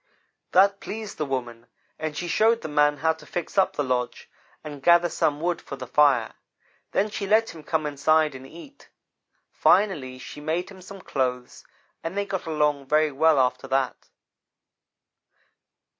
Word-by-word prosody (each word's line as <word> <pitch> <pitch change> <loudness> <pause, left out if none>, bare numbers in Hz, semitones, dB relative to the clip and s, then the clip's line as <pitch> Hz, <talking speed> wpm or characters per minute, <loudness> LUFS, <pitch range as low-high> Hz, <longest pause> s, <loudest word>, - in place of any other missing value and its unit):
"That 200 +2 +5
pleased 215 -1 -7
the 150 - -1
woman, 120 -3 -4 0.3
and 155 -1 -4
she 175 - -3
showed 225 +5 +3
the - - -3
man 150 -1 +2
how 160 - +4
to 160 -1 -16
fix 175 - -5
up 195 -1 +2
the 145 - 0
lodge 125 -2 -3 0.3
and 145 -3 -8
gather 170 +3 +5
some 145 -2 0
wood 175 +2 -1
for - - -8
the 130 - -8
fire. 135 -3 +3 0.6
Then 210 +2 0
she 200 -1 -4
let 220 +3 +3
him 160 - -11
come 155 0 -1
inside 155 +1 +2
and 130 0 -10
eat. 270 - -14 0.6
Finally, 170 -10 +2
she 130 +3 -10
made 165 +5 -2
him 190 -1 -13
some 195 +1 -11
clothes, 125 -4 -3 0.4
and 165 +4 -5
they 200 - 0
got 195 -3 -4
along 150 -3 0
very 155 +1 +3
well, 155 +2 +3
after 125 +1 0
that. 135 -1 -2
155 Hz, 165 wpm, -25 LUFS, 135-180 Hz, 0.6 s, That